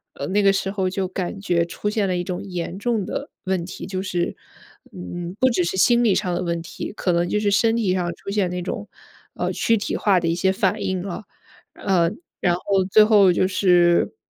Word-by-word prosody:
呃， 140 - -5
那 205 +2 +2
个 195 -1 +4
时 195 0 -1
候 190 -2 -1
就 190 0 -2
感 190 +1 -4
觉 170 -4 +1
出 210 +4 -4
现 210 -2 0
了 180 - 0
一 175 - -1
种 180 0 -4
严 180 -1 -5
重 225 -3 -1
的 280 - -5
问 185 -2 -1
题， 180 - -8
就 190 -1 -4
是， 175 -3 -2 0.6
嗯， 175 - -6
不 260 - +5
只 230 - +1
是 170 - -2
心 235 +6 +4
理 205 -4 +4
上 180 - -1
的 175 - -1
问 170 -1 -2
题， 165 - -7
可 185 - -1
能 175 0 +1
就 210 - 0
是 205 -1 +1
身 225 +3 +3
体 210 -6 +1
上 175 -2 -2
出 - - -10
现 200 -3 0
那 180 0 -3
种， 205 +4 -5 0.5
呃， - - -2
躯 230 - +2
体 205 - -2
化 195 -3 +3
的 165 - 0
一 - - +2
些 190 +2 +1
反 190 -2 0
应 185 -1 -1
了。 195 +2 -6 0.5
呃， 175 -4 +1 0.3
然 175 -1 +2
后 190 +1 0
最 215 +2 +7
后 205 -4 +5
就 185 - +2
是， 180 - +3
190 Hz, 245 characters per minute, -22 LUFS, 175-205 Hz, 0.6 s, 最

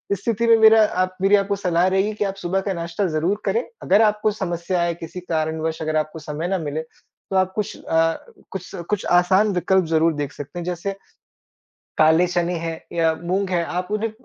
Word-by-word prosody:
स्थिति 230 +4 -1
में 230 - +7
मेरा 220 0 +7 0.2
आप 185 0 -5
मेरी 195 +2 +5
आपको 200 0 +1
सलाह 180 -2 +1
रहेगी 195 +3 +1
कि 210 - -2
आप 195 0 -3
सुबह 190 0 -1
का 195 -1 -2
नाश्ता 170 +3 -2
ज़रूर 175 +6 -1
करें, 470 - +1 0.2
अगर 200 +4 +4
आपको 210 0 +2
समस्या 175 -2 -2
या 170 - 0
किसी 175 +3 -7
कारणवश 160 -2 -2
अगर 155 0 -2
आपको 155 +1 -2
समय 155 +2 -4
ना 190 +1 0
मिले, 155 -2 -3
तो 160 +4 -12
आप 185 0 +2
कुछ 210 -2 -3
अ, 165 0 +2 0.3
कुछ 185 -2 -7 0.2
कुछ 210 -2 -1
आसान 190 +4 +3
विकल्प 180 +1 +2
ज़रूर 160 0 +2
देख 145 -1 -3
सकते 145 +5 -8
हैं 175 - -4
जैसे, 180 +2 -3 1.0
काले 160 +3 +5
चने 175 0 0
है 165 0 -3 0.2
या 165 -1 +2
मूँग 190 +3 -1
है 175 -2 +1 0.2
आप 180 - -5
उन्हें 215 +1 -1
180 Hz, 200 wpm, -22 LUFS, 165-200 Hz, 1.0 s, में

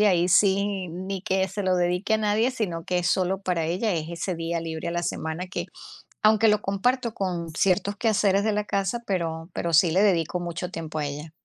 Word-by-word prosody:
y 210 - +5
ahí 175 -3 +3
sí 195 0 +3
ni 185 +3 -5
que 190 -1 +1
se 200 +2 -4
lo 185 -1 +2
dedique 180 +5 +1
a - - +2
nadie, 215 +3 +2
sino, 180 -10 -3
que 180 -1 0
es 175 - -1
solo 190 +2 +1
para 175 -4 0
ella, 185 +6 0
es 160 -1 -3
ese 170 +2 -3
día 165 +1 -2
libre 165 0 -4
a - - -2
la 175 0 -1
semana 160 +3 -3
que, 180 - -4 0.6
aunque 215 +1 +5
lo 210 0 +3
comparto 235 +5 0
con 175 -4 -2
ciertos 195 +3 +1
quehaceres 200 -3 +2
de 215 -1 +1
la 210 0 -1
casa, 195 +3 -1
pero 165 -3 -2
pero 170 -1 -2
sí 170 +2 +6
le 190 +5 +3
dedico 180 -3 +2
mucho 175 +1 -4
tiempo 160 -2 -5
a 150 - -1
ella. 150 +2 -7
185 Hz, 220 wpm, -25 LUFS, 170-200 Hz, 0.6 s, sí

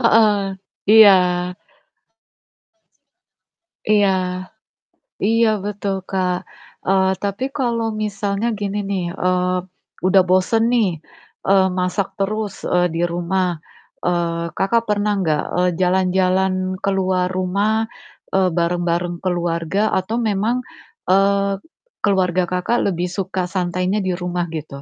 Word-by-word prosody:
Heeh, 215 -4 +4 0.5
iya. 220 -3 +9 2.7
Iya. 205 -2 +4 1.1
Iya, 225 +2 +3 0.2
betul, 205 -1 -2
Kak. 180 -2 0 0.5
Eee, 190 0 +3
tapi 200 +6 -2
kalau 235 -4 0 0.2
misalnya 200 +1 -2
gini 205 0 -3
nih, 190 -3 -1
eee, 185 -1 0 0.5
udah 190 +1 +6
bosan 185 +5 +3
nih, 225 -5 +3 0.6
eee, 190 -1 +5
masak 180 +2 0
terus, 210 +1 -2 0.2
eee, 180 0 +4
di 165 - -1
rumah. 175 +1 -1 0.5
Eee, 170 -1 0
Kakak 230 +4 +1
pernah 210 0 +1
nggak, 155 -4 +1
eee, 180 0 +3
jalan-jalan 185 +1 +2 0.3
keluar 185 -2 +1
rumah, 200 +4 0 0.5
eee, 190 -1 +3
bareng-bareng 175 0 0
keluarga 175 +1 0
atau 190 +5 -1
memang, 220 +3 0 0.5
eee, 200 +1 +3 0.5
keluarga 185 -2 +2
Kakak 180 +6 0 0.2
lebih 175 +1 -2
suka 190 -1 -2
santainya 185 +2 -1
di 185 -1 -1
rumah 180 -1 -2
gitu? 150 -3 -6
190 Hz, 105 wpm, -20 LUFS, 180-205 Hz, 2.7 s, iya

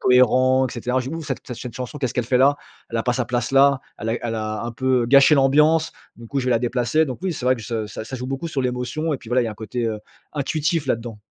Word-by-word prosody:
cohérent, 130 +1 +4
et - - -8
cetera. 125 +2 -1
Je 130 - -5
dis: - - -4
«Ouh, 165 - -5
cette 125 -4 -6
chanson, 130 +4 -6
qu'est-ce 130 -3 -2
qu'elle 125 - 0
fait 125 +1 +2
là? 140 +2 +5 0.3
Elle 115 - -2
a - - 0
pas 125 - +2
sa 125 -1 -1
place 120 +1 -2
là. 140 0 +5 0.2
Elle 110 - -4
est 115 - -2
elle 115 -1 -2
a 110 0 -3
un 120 - -4
peu 130 +1 +1
heu, - - -3
gâché 140 +4 +6
l'ambiance. 150 +4 +3 0.2
Du 115 - -11
coup 140 +4 -2
je 130 - -4
vais - - +2
la 115 - +3
déplacer.» 125 +5 +1
Donc 130 +2 -6
oui, 185 -2 -1
c'est 130 - -6
vrai 130 - +5
que 115 - -9
je - - -9 0.2
que 110 +1 -7
ça 130 +4 -6
joue 125 0 -5
beaucoup 135 +5 -4
sur 135 -4 -2
l'émotion. 125 +6 -2
Et - - -5
puis 120 - -13
voilà, 125 +1 +2
il - - -1
y - - -2
a - - -4
un - - -12
côté, 115 +3 -4
heu, 110 -1 -3 0.3
intuitif 155 +1 -1
là-dedans. 115 -3 -2
125 Hz, 295 wpm, -22 LUFS, 120-140 Hz, 0.3 s, gâché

